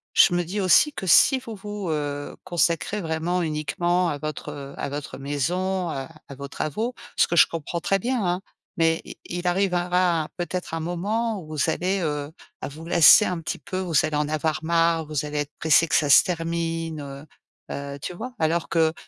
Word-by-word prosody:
je 175 Hz, -, +6 dB
me 175 Hz, 0 st, +1 dB
dis 190 Hz, +5 st, -3 dB
aussi 195 Hz, -, +5 dB
que 190 Hz, -, -6 dB
si 260 Hz, -, +6 dB
vous 230 Hz, -4 st, -8 dB
vous, 205 Hz, -2 st, -6 dB
heu, 145 Hz, -2 st, -3 dB
consacrez 175 Hz, +3 st, 0 dB
vraiment 165 Hz, +2 st, -1 dB
uniquement 175 Hz, +3 st, 0 dB
à 145 Hz, -, -2 dB
votre 145 Hz, -1 st, -6 dB
à -, -, -3 dB
votre 145 Hz, +1 st, -6 dB
maison, 175 Hz, +7 st, -1 dB
à 135 Hz, -2 st, -5 dB, 0.2 s
à 140 Hz, -, -8 dB
vos 140 Hz, +1 st, -7 dB
travaux, 215 Hz, -, -3 dB, 0.2 s
ce -, -, +4 dB
que 170 Hz, -, -1 dB
je 170 Hz, -, +7 dB
comprends 165 Hz, +1 st, -4 dB
très 195 Hz, +3 st, +1 dB
bien 245 Hz, +2 st, -1 dB
hein, 180 Hz, +1 st, 0 dB, 0.4 s
mais 165 Hz, 0 st, +2 dB
i -, -, -10 dB
il 175 Hz, +1 st, -5 dB
arrivera 180 Hz, -3 st, +1 dB
peut-être 180 Hz, -1 st, -4 dB
un -, -, -2 dB
moment 205 Hz, +7 st, -2 dB
où 155 Hz, -, -12 dB
vous 155 Hz, -2 st, -1 dB
allez, 190 Hz, +2 st, 0 dB
heu, 150 Hz, -2 st, -2 dB, 0.4 s
vous 160 Hz, +3 st, -10 dB
lasser 175 Hz, +4 st, +7 dB
un 180 Hz, -3 st, -2 dB
petit 160 Hz, -, -4 dB
peu, 185 Hz, -, -5 dB
vous 180 Hz, -3 st, -4 dB
allez 155 Hz, -1 st, -1 dB
en 150 Hz, 0 st, 0 dB
avoir 155 Hz, 0 st, -1 dB
marre, 165 Hz, 0 st, +2 dB
vous 150 Hz, -1 st, -2 dB
allez 150 Hz, 0 st, -3 dB
être 145 Hz, 0 st, -3 dB
pressé 160 Hz, +1 st, +4 dB
que -, -, -5 dB
ça 145 Hz, -, +2 dB
se 140 Hz, -, +8 dB
termine, 165 Hz, -4 st, -3 dB, 0.5 s
heu, 140 Hz, 0 st, -5 dB
tu 180 Hz, -, -5 dB
vois? 245 Hz, +7 st, -7 dB
Alors 160 Hz, +1 st, 0 dB
que 160 Hz, -1 st, +2 dB
165 Hz, 195 wpm, -24 LUFS, 150-180 Hz, 0.5 s, se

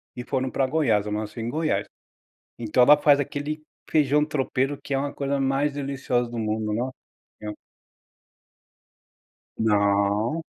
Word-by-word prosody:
e 125 Hz, -, -5 dB
foram 130 Hz, -1 st, -1 dB
para 135 Hz, -, +1 dB
Goiás, 125 Hz, -8 st, +2 dB
eu 105 Hz, -, -4 dB
nasci 105 Hz, +2 st, -4 dB
em 115 Hz, +1 st, -3 dB
Goiás. 155 Hz, +4 st, 0 dB, 0.7 s
Então 120 Hz, +2 st, +2 dB
ela 145 Hz, +4 st, +8 dB
faz 145 Hz, -1 st, +4 dB
aquele 145 Hz, +2 st, -4 dB, 0.3 s
feijão 150 Hz, -1 st, +3 dB
tropeiro 140 Hz, -2 st, -1 dB
que -, -, -6 dB
é 135 Hz, -, +2 dB
uma 140 Hz, +1 st, -2 dB
coisa 140 Hz, 0 st, -1 dB
mais 135 Hz, +2 st, +1 dB
deliciosa 135 Hz, -3 st, -1 dB
do 120 Hz, 0 st, -6 dB
mundo, 110 Hz, -1 st, -1 dB
Nossa 125 Hz, +4 st, -2 dB, 0.5 s
Senhora! 105 Hz, 0 st, -6 dB, 2.0 s
Não. 105 Hz, +6 st, +2 dB
130 Hz, 140 wpm, -25 LUFS, 110-145 Hz, 2.0 s, ela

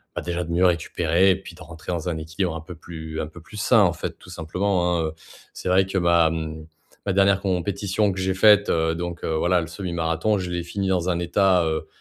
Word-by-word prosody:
bah, -, -, -2 dB
déjà 85 Hz, 0 st, -3 dB
de 85 Hz, -, -6 dB
mieux 90 Hz, +2 st, +3 dB
récupérer 85 Hz, +2 st, +2 dB
et -, -, +2 dB
puis 90 Hz, -3 st, -12 dB
de 90 Hz, -, -16 dB
rentrer 85 Hz, 0 st, -8 dB
dans 85 Hz, 0 st, -3 dB
un 85 Hz, -2 st, -1 dB
équilibre 80 Hz, +2 st, -3 dB
un 80 Hz, -, -5 dB
peu 85 Hz, +2 st, -10 dB
plus 80 Hz, -1 st, -8 dB
un -, -, -1 dB
peu 80 Hz, +2 st, -13 dB
plus 105 Hz, +6 st, -12 dB
sain -, -, +4 dB
en -, -, +4 dB
fait -, -, -6 dB
tout -, -, -15 dB
simplement, 90 Hz, +1 st, 0 dB
hein. 80 Hz, -, 0 dB
Heu, 80 Hz, -, -5 dB, 0.4 s
c'est 90 Hz, -, -4 dB
vrai 95 Hz, +1 st, +4 dB
que 95 Hz, -, -2 dB
ma, 85 Hz, -2 st, +4 dB
mmh, 80 Hz, -1 st, -5 dB, 0.4 s
ma 95 Hz, -, +1 dB
dernière 100 Hz, 0 st, +3 dB
compétition 100 Hz, +2 st, 0 dB
que 95 Hz, -, -5 dB
j'ai 95 Hz, 0 st, 0 dB
faite, 105 Hz, 0 st, +5 dB
heu, 80 Hz, 0 st, +1 dB
donc, 85 Hz, 0 st, -5 dB
heu, 80 Hz, -, -1 dB
voilà, 90 Hz, +2 st, +2 dB
le 80 Hz, -, -5 dB
semi-marathon, 85 Hz, +2 st, -1 dB
je 90 Hz, -2 st, -4 dB
l'ai 85 Hz, -1 st, -2 dB
fini 95 Hz, +3 st, -3 dB
dans 90 Hz, -1 st, +1 dB
un 85 Hz, -, +1 dB
état, 90 Hz, +1 st, +3 dB
heu, 80 Hz, -1 st, -2 dB
85 Hz, 245 wpm, -23 LUFS, 80-95 Hz, 0.4 s, faite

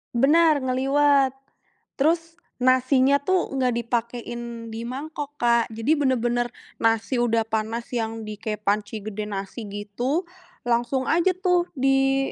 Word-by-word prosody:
Benar, 300 Hz, +2 st, +4 dB
ngeliwet. 270 Hz, +1 st, +3 dB, 0.6 s
Terus 330 Hz, +3 st, +1 dB, 0.2 s
nasinya 260 Hz, +2 st, +4 dB
tuh 370 Hz, +3 st, 0 dB
nggak 255 Hz, -3 st, +1 dB
dipakein 235 Hz, 0 st, -4 dB
di 230 Hz, +1 st, -5 dB
mangkok, 290 Hz, +2 st, -6 dB
Kak, 235 Hz, -3 st, +2 dB
jadi 225 Hz, +7 st, 0 dB
benar-benar 240 Hz, -3 st, +1 dB, 0.3 s
nasi 225 Hz, +2 st, +1 dB
udah 230 Hz, -2 st, +2 dB
panas 225 Hz, +2 st, -3 dB
yang 225 Hz, -2 st, -3 dB
di 210 Hz, -1 st, -7 dB
kayak 210 Hz, -1 st, -4 dB
panci 210 Hz, +1 st, -1 dB
gede 210 Hz, 0 st, -5 dB
nasi 205 Hz, +2 st, -5 dB
gitu, 210 Hz, -, -2 dB, 0.4 s
langsung 245 Hz, +2 st, 0 dB
aja 345 Hz, +5 st, +2 dB
tuh 360 Hz, -2 st, +1 dB
di 270 Hz, 0 st, +2 dB
245 Hz, 125 wpm, -24 LUFS, 225-275 Hz, 0.6 s, Benar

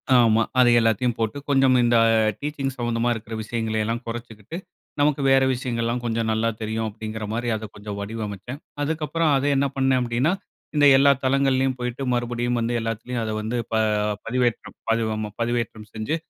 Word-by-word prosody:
ஆமா. 115 Hz, -2 st, +5 dB, 0.2 s
அத 125 Hz, -, +6 dB
எல்லாத்தையும் 115 Hz, +1 st, +1 dB
போட்டு 115 Hz, +5 st, -1 dB
கொஞ்சம் 135 Hz, -2 st, +4 dB
இந்த 120 Hz, 0 st, +3 dB, 0.2 s
ஆ -, -, +4 dB, 0.2 s
டீச்சிங் 140 Hz, -2 st, -3 dB
சம்மந்தமா 120 Hz, 0 st, 0 dB
இருக்கிற 115 Hz, 0 st, -7 dB
விஷயங்களை 110 Hz, -1 st, -2 dB
எல்லாம் 115 Hz, +2 st, -2 dB
கொறச்சுக்கிட்டு, 115 Hz, -, -7 dB, 0.4 s
நமக்கு 145 Hz, -1 st, +2 dB
வேற 135 Hz, 0 st, +5 dB
விஷயங்கள்லெல்லாம் 120 Hz, -1 st, -2 dB
கொஞ்சம் 115 Hz, -1 st, 0 dB
நல்லா 110 Hz, +1 st, +1 dB
தெரியும். 110 Hz, +1 st, -2 dB
அப்படிங்கிற 110 Hz, 0 st, -6 dB
மாதிரி, 120 Hz, +1 st, -2 dB
அத 110 Hz, 0 st, -5 dB
கொஞ்சம் 105 Hz, 0 st, -7 dB
வடிவமச்சேன். 110 Hz, +4 st, -5 dB, 0.2 s
அதுக்கப்புறம் 160 Hz, +1 st, 0 dB
அத 135 Hz, -, -1 dB
என்ன 140 Hz, 0 st, +2 dB
பண்னே? 135 Hz, -1 st, +2 dB
அப்டீனா, 125 Hz, +7 st, +1 dB, 0.4 s
இந்த 145 Hz, -1 st, +5 dB
எல்லா 140 Hz, +1 st, +6 dB
தளங்கள்லேயும் 135 Hz, -1 st, +2 dB
போயிட்டு 125 Hz, +2 st, -3 dB
மறுபடியும் 120 Hz, 0 st, -1 dB
வந்து, 115 Hz, +1 st, -1 dB
எல்லாத்திலயும் 115 Hz, +1 st, -3 dB
ப -, -, -2 dB
வந்து 115 Hz, +3 st, -2 dB, 0.7 s
பதி 115 Hz, -1 st, -1 dB
ஆமா 105 Hz, -1 st, -3 dB
பதிவேற்றம் 115 Hz, -2 st, -2 dB
செஞ்சு, 110 Hz, +9 st, -2 dB
120 Hz, 155 wpm, -24 LUFS, 110-130 Hz, 0.7 s, அத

